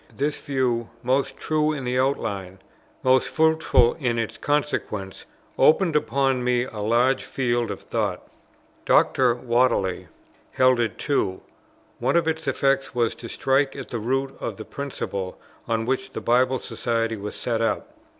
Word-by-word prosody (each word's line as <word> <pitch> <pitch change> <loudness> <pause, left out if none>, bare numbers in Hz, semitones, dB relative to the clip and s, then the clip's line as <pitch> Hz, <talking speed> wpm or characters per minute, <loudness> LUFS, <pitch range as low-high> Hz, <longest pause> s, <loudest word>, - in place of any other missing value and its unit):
This 145 +2 0
view, 125 -4 -1
most 135 +2 0
true 155 0 +1
in 140 -4 -5
its 125 +1 +1
outline, 100 -8 -1 0.5
most 130 0 +4
fruitful 160 -6 +3
in 120 -5 0
its 115 -1 -2
consequences, 140 -10 -2 0.3
opened 165 +1 +4
upon 135 -3 +1
me 125 0 +2
a 115 -4 -7
large 120 +5 +2
field 120 -3 -1
of 100 - -5
thought. - - -2 0.6
Dr. 125 -3 +4
Whately 120 -6 +1 0.5
held 130 -1 +4
it 115 -3 -1
too. 100 -10 -1 0.6
One - - +1
of 170 -1 +3
its 160 -1 -2
effects 135 -1 +1
was 120 -2 +1
to 115 - -10
strike 135 +1 +1
at - - -7
the 120 - -3
root 135 +4 -1
of - - -4
the - - -8
principle 100 -9 -5 0.3
on 115 -1 0
which 130 +1 -2
the - - -3
Bible 130 +2 +3
Society 115 -2 -2
was 105 0 -6
set 115 -2 -2
up. 115 -2 -1
125 Hz, 150 wpm, -24 LUFS, 115-135 Hz, 0.6 s, most